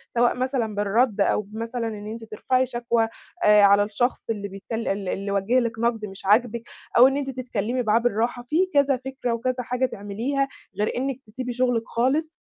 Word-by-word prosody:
سواء 240 +1 +3
مثلًا 250 -4 -1
بالرد 210 +2 +1
أو 200 - +2
بمثلًا 225 +3 -4
إن 210 -1 -6
أنتِ 225 +1 -6
ترفعي 255 +4 0
شكوى، 235 -2 0 0.4
آآ 210 0 +7
على 200 0 +6
الشخص 215 +5 -1
اللي 205 -3 -2
بيتكل 200 +4 -5
اللي 195 -2 -1
اللي 200 +1 -4
وجِّه 200 +6 +2
لِك 225 -2 -2
نقد 230 -2 0
مش 195 -1 -10
عاجبِك، 230 +3 +3 0.3
أو 245 +2 +9
إن 270 +1 0
أنتِ 275 -1 -2
تتكلّمي 250 -1 -2
معاه 220 0 +3
بالراحة، 240 +1 0
في 245 +5 -5 0.2
كذا 280 -2 +4
فكرة 260 -3 -2
وكذا 250 +2 -1
حاجة 250 +1 0
تعمليها، 240 +6 -2 0.3
غير 210 - +1
إنِك 265 +1 -2
تسيبي 245 +3 -5
شغلِك 245 -2 +1
خالص، 290 +7 0
235 Hz, 185 wpm, -24 LUFS, 210-255 Hz, 0.4 s, أو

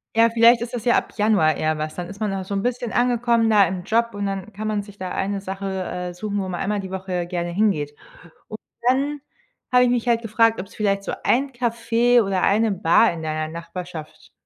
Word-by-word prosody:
Ja, 230 +1 +5
vielleicht 230 +1 +5
ist 235 +1 -5
das 240 -2 -4
ja 240 - +4
ab - - -3
Januar 205 -8 +3
eher 155 +1 0
was. 155 0 -4
Dann 175 -1 -5
ist 200 +1 -10
man 210 -3 -1
auch 190 -1 -3
so 200 +2 -5
'n 195 - -1
bisschen 245 -1 -2
angekommen 240 -1 +2
da 210 -2 +6
im 180 +1 -4
Job 230 +4 +1
und 205 0 -3
dann 195 +1 -4
kann 215 +2 -5
man 210 -1 0
sich 205 0 -14
da 185 -2 -5
eine 200 +1 -2
Sache, 195 0 -5 0.2
äh, 180 0 -5
suchen, 205 +2 -4
wo 190 -1 -3
man 175 -2 -4
einmal 205 +1 -1
die 190 -1 -6
Woche 185 -2 -3
gerne 175 -1 -3
hingeht. 170 -7 0 0.5
Und 215 - -8 0.3
dann 280 +3 +1 0.5
habe 250 0 +6
ich 250 - +3
mich 245 -1 -1
halt 235 -1 +2
gefragt, 225 +1 +2
ob's 190 +1 -8
vielleicht 200 -2 0
so - - -4
ein 270 +3 +2
Café 240 0 +2
oder 195 -2 -1
eine 215 +4 +3
Bar 190 +2 +3
in 165 - -7
deiner 155 0 -3
Nachbarschaft 170 -2 -8
200 Hz, 230 wpm, -22 LUFS, 180-230 Hz, 0.5 s, da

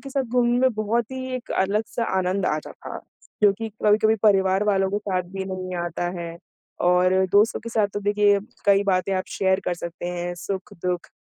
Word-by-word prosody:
के 275 - -9
साथ 275 0 0
घूमने 240 0 +2
में 260 0 +3
बहुत 215 +2 -1
ही 260 0 -5
एक 250 - -6
अलग-सा 210 +4 0
आनंद 185 +1 0
आता 155 0 -2
था। - - -8 0.4
जो 205 - +7
कि 225 +3 -5 0.2
कभी-कभी 220 +1 +4
परिवार 195 -1 +4
वालों 195 -2 +2
के 205 - 0
साथ 190 -3 -1
भी 195 0 -4
नहीं 185 -1 -5
आता 175 +1 -3
है 170 -1 -6 0.5
और 180 +1 +4 0.2
दोस्तों 205 +2 +4
के 230 - -7
साथ 215 -2 +2
तो 205 - -2
देखिए 205 0 +3 0.3
कई 200 0 +5
बातें 185 +2 0
आप 185 0 -1
शेयर 190 0 +2
कर 180 - 0
सकते 170 0 -6
हैं, 175 0 -3
सुख-दुःख 180 -1 -4
195 Hz, 190 wpm, -24 LUFS, 185-215 Hz, 0.5 s, जो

